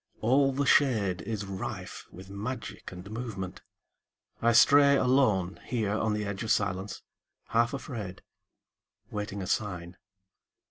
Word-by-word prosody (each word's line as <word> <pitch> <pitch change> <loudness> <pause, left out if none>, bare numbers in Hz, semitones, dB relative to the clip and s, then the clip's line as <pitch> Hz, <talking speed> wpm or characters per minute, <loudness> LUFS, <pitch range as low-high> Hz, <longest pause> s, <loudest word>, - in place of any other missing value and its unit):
All 135 +4 +3
the 135 +2 0
shadeIs 110 - +2
rife 95 -1 -6
with 95 +1 -11
magic 105 +5 -6
and 90 +1 -9
movement. 110 -5 -5 0.8
I 120 - +4
stray 140 +5 +7
aloneHere 110 -4 +1
on 110 0 0
the 105 0 -2
edge 100 -1 -4
of 110 - -3
silence, 100 -1 -1 0.5
half 115 0 +2
afraid, 115 -9 -6 0.9
Waiting 105 -2 -4
a - - -4
sign. 90 -4 -2
105 Hz, 120 wpm, -29 LUFS, 95-125 Hz, 0.9 s, stray